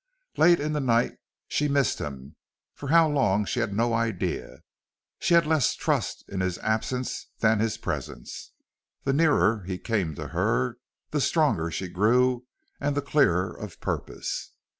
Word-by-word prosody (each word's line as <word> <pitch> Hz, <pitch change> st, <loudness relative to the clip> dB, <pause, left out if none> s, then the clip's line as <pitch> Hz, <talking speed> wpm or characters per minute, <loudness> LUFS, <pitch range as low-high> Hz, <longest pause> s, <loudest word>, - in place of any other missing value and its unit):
Late 170 Hz, +1 st, +5 dB
in 150 Hz, +1 st, -1 dB
the 150 Hz, -, 0 dB
night 120 Hz, -3 st, +1 dB, 0.3 s
she 150 Hz, -, 0 dB
missed 140 Hz, -3 st, +1 dB
him, 70 Hz, +1 st, -7 dB, 0.4 s
for 140 Hz, -, -7 dB
how 165 Hz, +1 st, +6 dB
long 115 Hz, -9 st, +2 dB
she 125 Hz, -, -2 dB
had 120 Hz, -3 st, 0 dB
no 115 Hz, +3 st, +1 dB
idea. 115 Hz, -, -2 dB, 0.6 s
She 170 Hz, -, +3 dB
had 170 Hz, -1 st, +5 dB
less 155 Hz, -5 st, +2 dB
trust -, -, -1 dB
in 95 Hz, -, -4 dB
his 95 Hz, -1 st, -1 dB
absence 115 Hz, +4 st, -2 dB
than 110 Hz, -1 st, +3 dB
his 110 Hz, 0 st, 0 dB
presence. -, -, -6 dB, 0.5 s
The 135 Hz, -, +1 dB
nearer 145 Hz, -8 st, +3 dB
he 90 Hz, 0 st, -4 dB
came 95 Hz, -8 st, -1 dB
to -, -, -6 dB
her 65 Hz, -, 0 dB, 0.3 s
the 150 Hz, -, 0 dB
stronger 115 Hz, -, +2 dB
she 95 Hz, +3 st, -4 dB
grew 125 Hz, +7 st, +2 dB, 0.3 s
and 145 Hz, 0 st, -1 dB
the 145 Hz, -, 0 dB
clearer 95 Hz, -, +2 dB
of 105 Hz, -5 st, -9 dB
purpose. -, -, -4 dB
115 Hz, 160 wpm, -26 LUFS, 95-145 Hz, 0.6 s, how